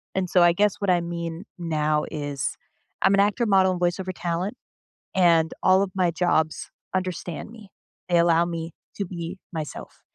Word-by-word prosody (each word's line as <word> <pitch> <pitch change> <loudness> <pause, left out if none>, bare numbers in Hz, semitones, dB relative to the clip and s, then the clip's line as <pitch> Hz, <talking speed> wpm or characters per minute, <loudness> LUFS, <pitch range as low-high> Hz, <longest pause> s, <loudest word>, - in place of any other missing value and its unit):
and 185 -2 0
so 180 - +4
I 170 -1 +6
guess 205 +2 +2
what 200 -2 -1
I 175 -1 +4
mean 170 +1 -5 0.2
now 155 -2 0
is 145 -3 -3 0.4
I'm 195 - +4
an 195 - +4
actor, 210 +4 +2
model, 190 -3 +4
and 180 - -4
voice-over 185 +2 0
talent, 175 +6 -2 0.6
and 165 -3 +4
all 190 +1 +5
of 195 - -4
my 185 -2 +2
jobs 160 -2 0 0.2
understand 185 +1 -3
me, 220 -4 -13 0.4
they 175 - +4
allow 170 0 +4
me 165 -1 -5 0.2
to 200 - -1
be 175 +1 -6 0.2
myself. 155 -2 -7
175 Hz, 170 wpm, -25 LUFS, 165-190 Hz, 0.6 s, I